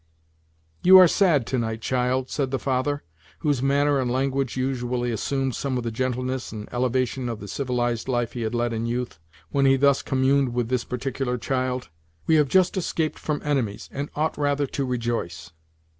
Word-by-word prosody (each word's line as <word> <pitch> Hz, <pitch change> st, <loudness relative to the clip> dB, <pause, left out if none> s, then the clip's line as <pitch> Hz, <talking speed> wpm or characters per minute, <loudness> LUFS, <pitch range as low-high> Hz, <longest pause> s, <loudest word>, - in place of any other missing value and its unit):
"You 190 Hz, +1 st, +9 dB
are 185 Hz, -1 st, +9 dB
sad 165 Hz, -, +3 dB
to 130 Hz, -, -1 dB
night, 110 Hz, -1 st, -3 dB
child," 130 Hz, +1 st, 0 dB
said 135 Hz, -3 st, -1 dB
the 135 Hz, -, -1 dB
father, 135 Hz, +2 st, -1 dB, 0.4 s
whose 145 Hz, -5 st, +1 dB
manner 140 Hz, +1 st, +2 dB
and 125 Hz, -2 st, 0 dB
language 135 Hz, +1 st, -1 dB
usually 125 Hz, -2 st, -1 dB
assumed 135 Hz, +4 st, -1 dB
some 135 Hz, 0 st, -2 dB
of 125 Hz, -, -2 dB
the 115 Hz, -, -2 dB
gentleness 130 Hz, +2 st, -2 dB
and 105 Hz, -1 st, -7 dB
elevation 125 Hz, 0 st, 0 dB
of 115 Hz, -2 st, -4 dB
the 100 Hz, -, -8 dB
civilized 120 Hz, 0 st, -1 dB
life 120 Hz, -3 st, -1 dB
he 120 Hz, -, -4 dB
had 110 Hz, +1 st, -2 dB
led 120 Hz, 0 st, 0 dB
in 115 Hz, +1 st, -2 dB
youth, 120 Hz, -7 st, -3 dB, 0.3 s
when 140 Hz, -1 st, +3 dB
he 135 Hz, -, +6 dB
thus 140 Hz, 0 st, +3 dB
communed 130 Hz, -1 st, +1 dB
with 120 Hz, -2 st, 0 dB
this 125 Hz, -2 st, 0 dB
particular 125 Hz, 0 st, -2 dB
child; 130 Hz, -3 st, -2 dB, 0.4 s
"we 160 Hz, -, +2 dB
have 150 Hz, -2 st, +5 dB
just 185 Hz, +5 st, +3 dB
escaped 165 Hz, -3 st, -1 dB
from 150 Hz, -1 st, -3 dB
enemies, 130 Hz, -9 st, -1 dB
and 140 Hz, +1 st, -4 dB
ought 155 Hz, +1 st, 0 dB
rather 145 Hz, 0 st, +1 dB
to 135 Hz, 0 st, -3 dB
rejoice." 115 Hz, -10 st, -3 dB
130 Hz, 185 wpm, -24 LUFS, 120-140 Hz, 0.4 s, You